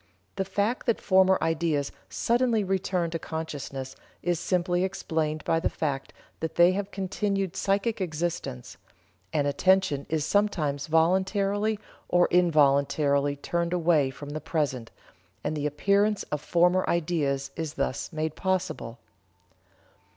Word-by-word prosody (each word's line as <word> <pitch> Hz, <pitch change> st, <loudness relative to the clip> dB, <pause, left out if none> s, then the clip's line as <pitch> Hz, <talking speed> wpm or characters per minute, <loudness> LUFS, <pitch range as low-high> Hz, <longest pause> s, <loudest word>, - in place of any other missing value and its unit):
The 195 Hz, -1 st, -1 dB
fact 205 Hz, +7 st, -1 dB
that 235 Hz, -, +2 dB
former 190 Hz, -1 st, +4 dB
ideas 160 Hz, -3 st, 0 dB, 0.2 s
suddenly 235 Hz, -, +1 dB
return 185 Hz, -3 st, -1 dB
to 165 Hz, -, -2 dB
consciousness 140 Hz, -5 st, -5 dB, 0.3 s
is 175 Hz, -1 st, 0 dB
simply 175 Hz, 0 st, 0 dB
explained 160 Hz, -5 st, -2 dB
by 165 Hz, -, +2 dB
the 165 Hz, -, 0 dB
fact 140 Hz, -3 st, -3 dB, 0.3 s
that 160 Hz, 0 st, -4 dB
they 175 Hz, +1 st, +6 dB
have 200 Hz, +1 st, -2 dB
continued 195 Hz, -1 st, -2 dB
psychic 200 Hz, +2 st, 0 dB
existence: 160 Hz, -, -3 dB, 0.5 s
and 150 Hz, -3 st, +1 dB
attention 150 Hz, -1 st, +2 dB
is 155 Hz, -1 st, 0 dB
sometimes 155 Hz, -7 st, 0 dB
voluntarily 195 Hz, +6 st, +2 dB, 0.3 s
or 175 Hz, 0 st, +4 dB
involuntarily 145 Hz, -3 st, +3 dB
turned 170 Hz, +4 st, -2 dB
away 165 Hz, -5 st, +3 dB
from 140 Hz, +2 st, -9 dB
the 155 Hz, +1 st, -4 dB
present, 145 Hz, -7 st, -2 dB, 0.5 s
and 155 Hz, -, -2 dB
the 150 Hz, -1 st, -1 dB
appearance 200 Hz, +7 st, +2 dB
of 150 Hz, -, -2 dB
former 180 Hz, +3 st, +3 dB
ideas 150 Hz, -5 st, 0 dB
is 160 Hz, -3 st, -4 dB
thus 135 Hz, -1 st, -2 dB
made 155 Hz, -1 st, -2 dB
possible." 185 Hz, -10 st, -2 dB
170 Hz, 130 wpm, -27 LUFS, 150-190 Hz, 0.5 s, they